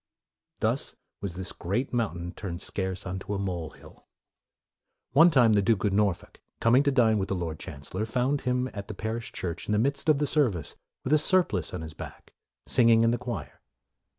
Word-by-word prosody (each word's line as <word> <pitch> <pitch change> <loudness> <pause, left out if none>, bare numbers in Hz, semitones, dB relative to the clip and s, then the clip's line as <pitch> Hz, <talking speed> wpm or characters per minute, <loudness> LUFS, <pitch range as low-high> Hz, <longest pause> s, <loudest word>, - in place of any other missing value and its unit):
" - - -57
Thus - - 0 0.3
was 95 -3 -4
this 90 -2 -5
great 105 +11 -2
mountain 90 -7 -2
turned 90 -2 -6
scarce 95 0 -3
unto 95 +2 -4
a - - -1
mole 90 -5 -3
hill." - - -17 1.0
One 165 +5 +7
time, 125 -8 +5
the 100 - +4
Duke 100 -1 +2
of 100 - +1
Norfolk, 100 -3 0 0.2
coming 120 +4 +5
to 140 0 +2
dine 115 -5 +4
with 95 - -2
the 95 - 0
Lord 80 -3 -4
Chancellor, 80 +10 -5
found 130 +5 0
him 125 0 0
at 100 -1 -6
the 105 - -6
parish 115 +3 -4
church 85 -2 -4
in 105 - 0
the - - +3
midst 140 +7 0
of 150 - +5
the 145 - +1
service, 120 - +1 0.3
with 135 - 0
a 155 - +6
surplice 155 - +2
on 90 - -5
his 80 -1 -7
back, - - -10 0.3
singing 115 -2 +4
in 115 - +4
the 120 - -1
choir. 125 -1 -6
105 Hz, 200 wpm, -28 LUFS, 95-125 Hz, 1.0 s, One